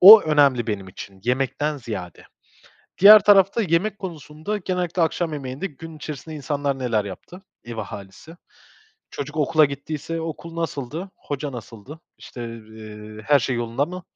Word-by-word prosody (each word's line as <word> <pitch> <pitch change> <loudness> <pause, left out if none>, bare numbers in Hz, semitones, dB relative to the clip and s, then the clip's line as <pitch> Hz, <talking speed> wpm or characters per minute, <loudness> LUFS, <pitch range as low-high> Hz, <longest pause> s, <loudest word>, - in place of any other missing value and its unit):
O 210 +4 +12
önemli 140 -6 +3
benim 100 -3 -3
için 95 +1 -10
yemekten 135 +4 0
ziyade. 105 - -7 0.7
Diğer 210 +1 +10
tarafta 200 +2 +5
yemek 190 +3 +1
konusunda 160 +2 -5
genellikle 180 -2 -1
akşam 165 0 0
yemeğinde 140 +5 -4
gün 160 +1 -10
içerisinde 155 +1 -7
insanlar 145 -1 -2
neler 115 -5 0
yaptı, 175 - -10 0.2
ev 120 -1 -7
ahalisi. 105 - -8 0.7
Çocuk 150 +2 -6
okula 155 +1 +4
gittiyse 150 +4 -4
okul 165 +1 -6
nasıldı? 165 +3 -4
Hoca 145 -1 -5
nasıldı? 120 +5 -10 0.2
İşte, 120 - -9
eee, 110 -1 -11
her 145 -1 +6
şey 125 0 -1
yolunda 120 +4 0
mı, 180 +1 -7
145 Hz, 140 wpm, -23 LUFS, 120-165 Hz, 0.7 s, O